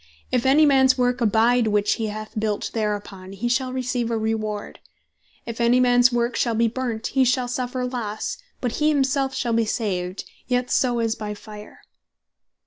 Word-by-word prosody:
If 250 Hz, 0 st, +1 dB
any 295 Hz, +3 st, +6 dB
mans 265 Hz, -2 st, +4 dB
work 250 Hz, 0 st, +1 dB
abide, 230 Hz, +2 st, +3 dB
which 210 Hz, -1 st, +2 dB
he 220 Hz, -, 0 dB
hath 215 Hz, +1 st, -6 dB
built 210 Hz, -1 st, -2 dB
thereupon, 205 Hz, -3 st, -4 dB
he 205 Hz, +5 st, -3 dB
shall 255 Hz, +1 st, 0 dB
receive 250 Hz, -2 st, -2 dB
a 230 Hz, -, 0 dB
reward: 215 Hz, -1 st, -3 dB, 0.7 s
If 235 Hz, 0 st, -5 dB
any 235 Hz, +2 st, +4 dB
mans 245 Hz, 0 st, +5 dB
work 240 Hz, 0 st, 0 dB
shall 235 Hz, -2 st, 0 dB
bee 230 Hz, +1 st, +3 dB
burnt, 235 Hz, -1 st, -3 dB
he 270 Hz, -, +4 dB
shall 250 Hz, 0 st, +1 dB
suffer 250 Hz, +1 st, -3 dB
losse; 245 Hz, -, -4 dB, 0.2 s
but 245 Hz, -3 st, -2 dB
he 305 Hz, 0 st, +2 dB
himself 270 Hz, -2 st, +1 dB
shall 240 Hz, -2 st, -1 dB
be 230 Hz, 0 st, +2 dB
saved, 185 Hz, -4 st, -2 dB, 0.2 s
yet 250 Hz, 0 st, 0 dB
so 245 Hz, -2 st, +2 dB
as 225 Hz, -1 st, 0 dB
by 210 Hz, -2 st, -6 dB
fire." 210 Hz, 0 st, -12 dB
235 Hz, 175 wpm, -23 LUFS, 215-255 Hz, 0.7 s, any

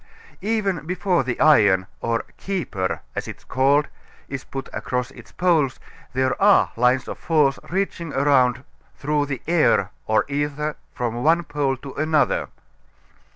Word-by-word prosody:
Even 195 Hz, -7 st, -1 dB
before 180 Hz, -3 st, +1 dB
the 125 Hz, -1 st, -3 dB
iron, 100 Hz, -12 st, +5 dB
or 115 Hz, 0 st, -1 dB
"keeper," 130 Hz, -, -3 dB
as -, -, -3 dB
it -, -, -7 dB
is -, -, -24 dB
called, 140 Hz, +3 st, +2 dB, 0.4 s
is 135 Hz, -1 st, -5 dB
put 135 Hz, 0 st, -6 dB
across 125 Hz, 0 st, -3 dB
its -, -, -14 dB
poles 165 Hz, -7 st, +1 dB, 0.3 s
there 130 Hz, +4 st, 0 dB
are 200 Hz, 0 st, +5 dB
lines 125 Hz, +2 st, +2 dB
of -, -, -6 dB
force 150 Hz, -4 st, +2 dB
reaching 180 Hz, -3 st, -2 dB
around 130 Hz, -3 st, +3 dB, 0.3 s
through 145 Hz, 0 st, 0 dB
the 135 Hz, -3 st, -5 dB
air 155 Hz, -, +3 dB, 0.2 s
or 110 Hz, 0 st, +2 dB
ether 145 Hz, +1 st, -2 dB, 0.2 s
from 120 Hz, -2 st, -3 dB
one 165 Hz, +3 st, +4 dB
pole 145 Hz, -4 st, -1 dB
to 135 Hz, +1 st, -9 dB
another. 155 Hz, +1 st, +1 dB
140 Hz, 145 wpm, -22 LUFS, 125-160 Hz, 0.4 s, iron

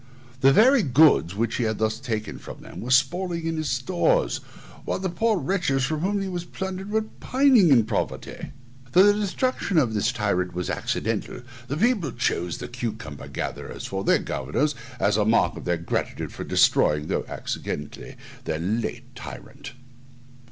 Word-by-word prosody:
The 135 Hz, +1 st, +6 dB
very 250 Hz, -, +6 dB
goods 125 Hz, -, +4 dB
which 115 Hz, +2 st, -1 dB
he 125 Hz, -, 0 dB
had 110 Hz, -1 st, -1 dB
thus 110 Hz, 0 st, 0 dB
taken 110 Hz, -4 st, -4 dB
from -, -, -10 dB
them -, -, -9 dB
were 120 Hz, -, -6 dB
spoiling 165 Hz, +6 st, +2 dB
in 165 Hz, 0 st, -1 dB
his 155 Hz, -2 st, -2 dB
stores, 180 Hz, -, +1 dB, 0.5 s
while -, -, -2 dB
the 185 Hz, -1 st, -3 dB
poor 220 Hz, +4 st, +1 dB
wretches 145 Hz, -4 st, 0 dB
from 155 Hz, +3 st, -2 dB
whom 200 Hz, +5 st, 0 dB
they 195 Hz, -, -2 dB
were 180 Hz, -2 st, -3 dB
plundered 190 Hz, +2 st, -5 dB
were 220 Hz, +1 st, +1 dB
pining 255 Hz, -, +3 dB
in 120 Hz, -6 st, +5 dB
poverty. 110 Hz, -2 st, -4 dB, 0.4 s
Though 185 Hz, -, +7 dB
the 205 Hz, 0 st, +6 dB
destruction 210 Hz, -1 st, -1 dB
of 125 Hz, -8 st, +3 dB
this 110 Hz, +2 st, +1 dB
tyrant 100 Hz, -6 st, -1 dB
was 90 Hz, 0 st, -2 dB
accidental, -, -, -2 dB, 0.2 s
the 140 Hz, +3 st, -3 dB
people 200 Hz, -, +1 dB
chose 90 Hz, -7 st, -1 dB
the -, -, -6 dB
cucumber 110 Hz, -, -6 dB
gatherers -, -, -5 dB
for 95 Hz, 0 st, -3 dB
their -, -, +4 dB
governors, 75 Hz, -, -1 dB, 0.3 s
as 100 Hz, +1 st, +2 dB
a 105 Hz, -, +3 dB
mark 110 Hz, +2 st, +2 dB
of -, -, -9 dB
their 85 Hz, -1 st, +1 dB
gratitude 85 Hz, -, -3 dB
for -, -, -6 dB
destroying, 75 Hz, 0 st, +3 dB
though -, -, -2 dB
accidentally, 75 Hz, -1 st, -5 dB, 0.3 s
their 80 Hz, -, -1 dB
late 105 Hz, +8 st, -3 dB
tyrant. -, -, -10 dB
135 Hz, 170 wpm, -25 LUFS, -, 0.5 s, Though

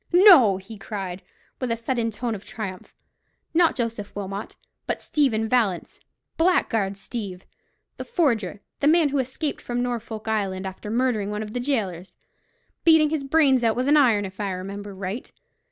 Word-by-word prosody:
"No," 345 Hz, -, +8 dB
he 200 Hz, +3 st, -11 dB
cried, 195 Hz, -2 st, -5 dB, 0.4 s
with 255 Hz, -3 st, -2 dB
a 230 Hz, -, 0 dB
sudden 230 Hz, 0 st, -1 dB
tone 230 Hz, +2 st, -3 dB
of 200 Hz, -2 st, -7 dB
triumph, 195 Hz, -5 st, -7 dB, 0.6 s
"not 335 Hz, 0 st, +4 dB
Joseph 230 Hz, -4 st, -4 dB
Wilmot, 200 Hz, 0 st, -5 dB, 0.3 s
but -, -, -1 dB
Stephen 230 Hz, -7 st, +1 dB
Vallance—Blackguard 225 Hz, -, 0 dB
Steeve, 195 Hz, -3 st, -6 dB, 0.5 s
the -, -, -5 dB
forger—the 235 Hz, -, -1 dB
man 320 Hz, -1 st, +5 dB
who 280 Hz, 0 st, 0 dB
escaped 265 Hz, +4 st, -3 dB
from 245 Hz, 0 st, -2 dB
Norfolk 225 Hz, -3 st, -4 dB
Island, 195 Hz, -3 st, -1 dB
after 190 Hz, +2 st, -6 dB
murdering 230 Hz, -3 st, 0 dB
one 210 Hz, +1 st, -3 dB
of 215 Hz, 0 st, -8 dB
the 245 Hz, -, -2 dB
gaolers—beating 260 Hz, -, -1 dB
his 310 Hz, -3 st, -1 dB
brains 275 Hz, -3 st, +3 dB
out 225 Hz, -1 st, +3 dB
with 250 Hz, +2 st, -1 dB
an 295 Hz, -, +5 dB
iron, 235 Hz, -8 st, +4 dB
if 190 Hz, +1 st, -10 dB
I 205 Hz, -1 st, -1 dB
remember 195 Hz, +2 st, -6 dB
right. 195 Hz, +5 st, -5 dB
225 Hz, 155 wpm, -24 LUFS, 200-265 Hz, 0.6 s, No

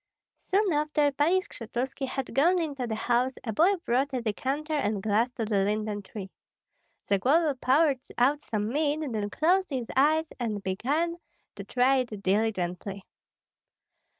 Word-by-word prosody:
Soon 390 Hz, -2 st, +2 dB
after 300 Hz, -1 st, +2 dB
Pani 315 Hz, +7 st, +2 dB
Skshetuski 260 Hz, -, -5 dB
had 265 Hz, 0 st, -4 dB
gone 345 Hz, +7 st, +4 dB
into 280 Hz, -7 st, -3 dB
the 220 Hz, -, -2 dB
house 245 Hz, +3 st, +1 dB
a 225 Hz, -, -3 dB
boy 355 Hz, -, +4 dB
brought 265 Hz, +4 st, +1 dB
a 250 Hz, -, -1 dB
decanter 275 Hz, +8 st, -2 dB
and 210 Hz, -9 st, 0 dB
glass 220 Hz, +3 st, +2 dB
to 230 Hz, -, -3 dB
the 205 Hz, -2 st, +1 dB
linden 210 Hz, 0 st, -1 dB
tree. 195 Hz, -1 st, -8 dB, 0.8 s
Zagloba 280 Hz, -, +3 dB
poured 280 Hz, 0 st, +3 dB, 0.2 s
out 280 Hz, +4 st, +3 dB
some 210 Hz, -4 st, -2 dB
mead, 295 Hz, +3 st, 0 dB
then 220 Hz, -7 st, -2 dB
closed 365 Hz, -, +2 dB
his 260 Hz, -5 st, -2 dB
eyes 310 Hz, +4 st, +4 dB
and 215 Hz, -4 st, -3 dB
began 290 Hz, -, -1 dB, 0.4 s
to 200 Hz, -, -8 dB
try 255 Hz, +5 st, +2 dB
it 225 Hz, -6 st, -3 dB
diligently. 195 Hz, -1 st, -1 dB
255 Hz, 150 wpm, -28 LUFS, 215-300 Hz, 0.8 s, gone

